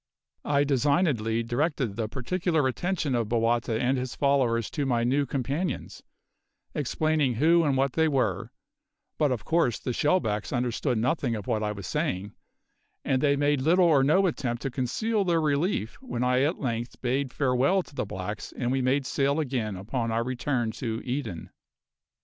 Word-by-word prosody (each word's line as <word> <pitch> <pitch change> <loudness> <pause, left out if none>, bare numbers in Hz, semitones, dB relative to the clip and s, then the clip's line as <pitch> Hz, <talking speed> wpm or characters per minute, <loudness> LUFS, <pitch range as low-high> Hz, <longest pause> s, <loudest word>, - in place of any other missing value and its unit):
I 145 -1 +3
designedly 140 -5 +1
directed 130 -2 -1
the 115 -2 -2
particular 155 +4 0
attention 165 +1 -1
of 115 -3 0
Bowata 115 -1 +1
and 130 +2 +1
his 125 0 -4
followers 125 -5 +1
to 145 -2 -2
my 120 -2 +1
new 135 +4 +1
companions, 140 +7 -3 0.7
explaining 150 -2 0
who 165 +7 +4
and 140 -4 +1
what 135 -1 +1
they 160 0 +3
were; 130 - 0 0.7
but 150 -3 +3
of 120 -4 -3
course 165 -9 +2
the 125 - -4
shellbacks 115 - 0
understood 125 +1 0
nothing 120 +1 0
of 105 -3 -6
what 110 - 0
I 105 -1 -1
was 100 -3 -7
saying, 95 +6 -2 0.7
and 130 -1 +1
they 140 -1 +3
made 145 -1 +1
little 175 +6 +4
or 150 -5 +5
no 185 +8 +4
attempt 125 -9 -2
to 135 - -2
conceal 200 - 0
their 170 -3 +2
relief 150 - -1
when 185 - -3
I 125 +1 +2
at 150 +6 +1
length 120 -3 -3
bade 130 +2 0
farewell 140 +9 +2
to - - -18
the - - -2
blacks 100 +2 -5
and 125 -1 -1
we 135 0 +1
made 130 +2 +1
sail 140 +3 +1
again 125 -8 -2
upon 115 +5 -3
our 115 +1 +1
return 125 -1 -1
to 115 -1 -4
Eden. 120 - -4
130 Hz, 170 wpm, -27 LUFS, 115-145 Hz, 0.7 s, or